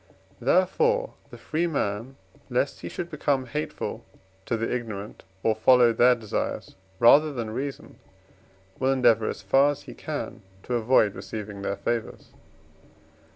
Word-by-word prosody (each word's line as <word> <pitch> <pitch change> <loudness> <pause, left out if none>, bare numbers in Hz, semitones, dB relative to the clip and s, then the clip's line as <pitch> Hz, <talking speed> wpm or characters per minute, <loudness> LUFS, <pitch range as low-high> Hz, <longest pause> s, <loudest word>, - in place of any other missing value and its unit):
Therefore - - +2 0.2
the - - -11
free 165 +3 -1
man, 120 -4 -2 0.3
lest 130 +3 -1
he - - -6
should 175 0 -6
become 140 -3 0
hateful 150 +5 -4 0.4
to 115 - 0
the 115 +1 -1
ignorant, 110 -4 -5 0.2
or 110 - +3
follow 120 +2 +5
their 125 +2 +5
desires 110 -3 -4 0.2
rather 145 +8 +6
than 115 -5 -4
reason, 135 +4 -6 0.8
will 130 0 +2
endeavour, 115 -4 +3
as - - -6
far 135 +9 +4
as 145 - -4
he - - -10
can, - - -6 0.2
to 125 - -4
avoid 115 -3 +3
receiving 105 -2 -7
their 100 0 -2
favours. 115 -2 -3
120 Hz, 140 wpm, -26 LUFS, 110-140 Hz, 0.8 s, rather